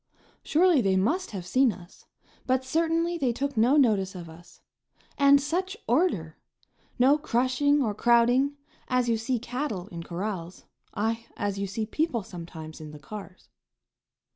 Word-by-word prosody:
Surely 335 -2 +3
they 195 -3 +2
must 310 - 0
have 190 -4 -6
seen 255 +6 +3
us, 180 -1 -14 0.4
but 260 0 +1
certainly 330 +4 0
they 260 -5 +1
took 275 +3 -3
no 240 +6 +4
notice 205 -8 +2
of 170 -2 -8
us. 175 +2 -16 0.5
And 280 0 +6
such 350 +7 -2
order! 230 - 0 0.6
No 275 +4 +4
crushing 280 +2 +2
or 215 -4 -1
crowding, 240 +5 +3 0.3
as 250 -1 +1
you 230 - +2
see 240 +3 -1
cattle 245 -5 -4
in 170 -1 -7
corrals, 180 0 -5 0.3
aye, 225 +2 -2
as 200 -1 -2
you 200 - -2
see 215 +3 -3
people 275 -1 -1
sometimes 165 -3 -9
in 155 - -8
the 150 0 -11
cars. 195 +2 -10
235 Hz, 150 wpm, -27 LUFS, 190-280 Hz, 0.6 s, And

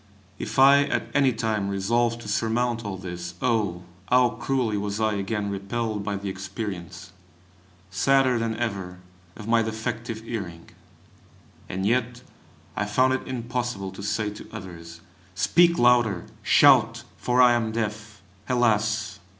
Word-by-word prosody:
If - - -5
I 140 +1 +7
at - - -2
any 140 -2 +4
time 110 -3 -1
resolved 115 +4 0
to 105 - -10
surmount 115 +2 0
all 100 -3 -5
this, 90 -1 -7
oh! 100 -6 0 0.3
how 125 -1 +5
cruelly 120 -1 -1
was 100 +1 -3
I 110 -1 +1
again 100 0 -2
repelled 105 +2 -3
by 100 0 -2
the 100 0 -5
experience, 95 -2 -6 0.8
sadder 130 +5 +3
than 115 -1 -2
ever, 100 -6 -4 0.4
of 105 - -9
my 115 0 +4
defective 115 +1 -4
hearing! 95 -8 -7 1.0
and 95 +1 -3
yet 125 +2 0 0.5
I 105 - -1
found 130 +5 +2
it 130 - -3
impossible 120 -5 -3
to 95 - -10
say 105 +1 -1
to 105 - -11
others: 85 -5 -10 0.3
Speak 170 - +4
louder; 120 -6 +3 0.2
shout! - - +5
for 125 0 0
I 125 -1 +7
am 115 -2 0
deaf! 110 -2 -4 0.3
Alas! 110 -5 +1
110 Hz, 140 wpm, -25 LUFS, 100-120 Hz, 1.0 s, I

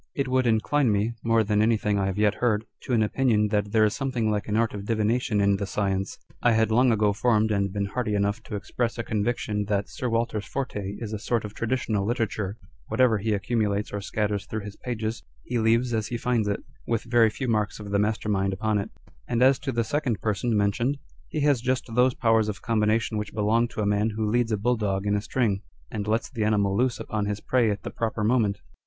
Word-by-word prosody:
It 140 -1 -1
would 130 -1 +2
incline 115 +3 +2
me 105 +3 +1
(more 115 -1 +3
than 105 0 +1
anything 110 -2 +2
I 95 - +1
have 95 0 -2
yet 105 0 +3
heard) 115 -3 0 0.2
to 125 - -2
an 110 -2 +4
opinion 105 -2 +2
that 105 -1 0
there 110 0 +4
is 105 - +1
something 125 -5 -1
like 105 -1 -2
an 105 0 0
art 115 -1 +1
of 100 -1 -6
divination 110 0 +1
in 100 0 +3
the 100 - -3
science. 95 -1 -1 0.2
I 120 - +4
had 110 0 +2
long 125 +2 +4
ago 105 -2 +2
formed 110 0 +2
and 100 -2 +1
been 100 0 -1
hardy 105 0 -2
enough 100 0 0
to - - -5
express 115 +4 -2
a 115 - -2
conviction 105 -1 -1
that 100 -1 -1
Sir 125 - -3
Walter's 115 -2 -1
forte 105 -7 -4
is 110 -2 -6
a 105 - -3
sort 115 0 -1
of 105 - -7
traditional 115 -3 -1
literature 110 -3 -2 0.3
(whatever 125 -4 +3
he 110 +2 0
accumulates 105 0 0
or 105 - -2
scatters 105 0 -2
through 110 - -4
his 105 0 -8
pages, 115 -2 -4 0.2
he 120 -1 -2
leaves 115 +2 +2
as 110 -2 0
he 120 - -3
finds 115 -3 0
it, 100 - -2 0.2
with 115 -2 0
very 115 -1 +4
few 130 +4 -4
marks 105 -3 0
of 105 -1 -7
the 100 - +2
master 105 +1 0
mind 95 -2 +1
upon 110 +2 0
it) 100 - -4
â€" - - -31 0.2
and 120 0 +2
as 135 0 +5
to 135 - -3
the 115 -1 0
second 125 -4 -1
person 110 +3 0
mentioned, 115 +7 +1 0.3
he 155 - -3
has 140 -4 +3
just 130 +1 0
those 125 +1 +3
powers 110 -2 +2
of 105 +1 -6
combination 110 -1 +1
which 105 0 -6
belong 110 +3 +2
to 110 - -5
a - - 0
man 105 +2 +2
who 110 0 -2
leads 120 -1 +1
a 110 - +1
bulldog 105 -3 0
in 105 0 +2
a 100 - 0
string, 105 -4 0 0.3
and 105 -1 -4
lets 110 +2 +1
the 115 -6 -3
animal 100 -2 +2
loose 125 +2 +1
upon 105 -1 -2
his 105 0 -2
prey 120 -2 +2
at 105 0 -3
the - - -5
proper 110 -1 -2
moment. 105 -3 +2
110 Hz, 235 wpm, -26 LUFS, 105-120 Hz, 0.3 s, as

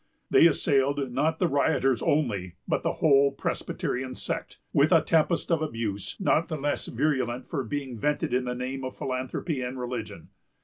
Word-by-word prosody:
They 165 - +8
assailed 140 -3 +1
not 155 +6 +1
the 180 - +2
rioters 140 -4 +2
only, 100 - 0
but - - 0
the - - 0
whole 140 -2 +4
Presbyterian 130 -1 -3
sect, - - -4 0.2
with - - +4
a - - +6
tempest 165 +2 +1
of 165 -2 +2
abuse, 115 -9 -3
not 170 -4 +2
the 155 - -3
less 145 0 -2
virulent 130 -4 -1
for 140 -5 -3
being 130 -1 -4
vented 150 +2 0
in 125 0 +1
the 125 0 -2
name 130 +2 -4
of 130 - -6
philanthropy 130 +3 -3
and 125 +1 -4
religion. 125 -3 -5
135 Hz, 170 wpm, -27 LUFS, 125-150 Hz, 0.2 s, They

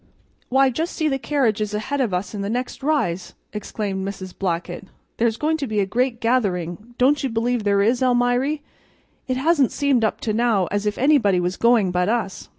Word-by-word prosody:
"Why, 265 +1 +4
just 325 +7 -3
see 315 - 0
the 270 -2 0
carriages 220 -8 0
ahead 265 +7 -2
of 240 -6 0
us 180 +4 -3
on 205 - -4
the 200 - -3
next 250 +4 -3
rise!" 190 - -1 0.2
exclaimed 205 -2 -4
Mrs. 190 -1 -6
Blackett. 175 0 -3 0.3
"There's 230 -1 +1
going 315 +1 0
to 280 -3 -3
be 215 -2 -1
a 200 - +2
great 245 +4 -1
gathering, 210 -2 -1
don't 275 +3 +3
you 270 - -1
believe 230 0 0
there 200 -1 +3
is, 240 +4 +2
Almiry? 250 +4 +1 0.6
It 255 -1 -1
hasn't 285 -2 +3
seemed 280 -5 +1
up 220 - 0
to 215 - -1
now 225 -4 +2
as 205 +1 -1
if 210 - -1
anybody 245 -9 +3
was 180 +1 -1
going 230 -5 +3
but 180 +2 +1
us. 220 -4 -2
230 Hz, 195 wpm, -22 LUFS, 200-260 Hz, 0.6 s, Why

